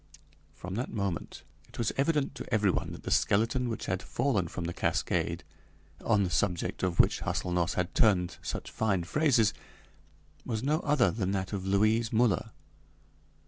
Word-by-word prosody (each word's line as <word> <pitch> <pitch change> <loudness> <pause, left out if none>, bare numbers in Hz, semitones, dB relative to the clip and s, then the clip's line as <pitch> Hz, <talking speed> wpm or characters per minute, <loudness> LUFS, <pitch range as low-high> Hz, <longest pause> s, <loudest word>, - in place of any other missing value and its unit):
From 90 +1 -7
that 120 +6 -3
moment 100 -5 -4 0.3
it - - -14
was 115 - 0
evident 145 0 +1
to - - -9
everyone 105 -4 +1
that - - -9
the - - -4
skeleton 115 +4 +2
which 115 - -4
had 90 +1 -2
fallen 105 -11 0
from 85 - -5
the 85 +1 -3
cascade, - - -1 0.6
on 105 -3 +3
the 90 - -2
subject 90 +2 -1
of 90 -2 -1
which - - +4
Hâselnoss 90 -1 -1
had 90 -1 -1
turned 90 -5 +3
such - - -5
fine 100 -5 0
phrases, 120 - +2 0.9
was 110 -1 -3
no 150 +3 +2
other 145 -6 +2
than 100 -4 -2
that 95 0 -2
of 95 -1 -3
Louise 110 +3 +2
Müller. 115 -1 +2
105 Hz, 160 wpm, -30 LUFS, 90-115 Hz, 0.9 s, which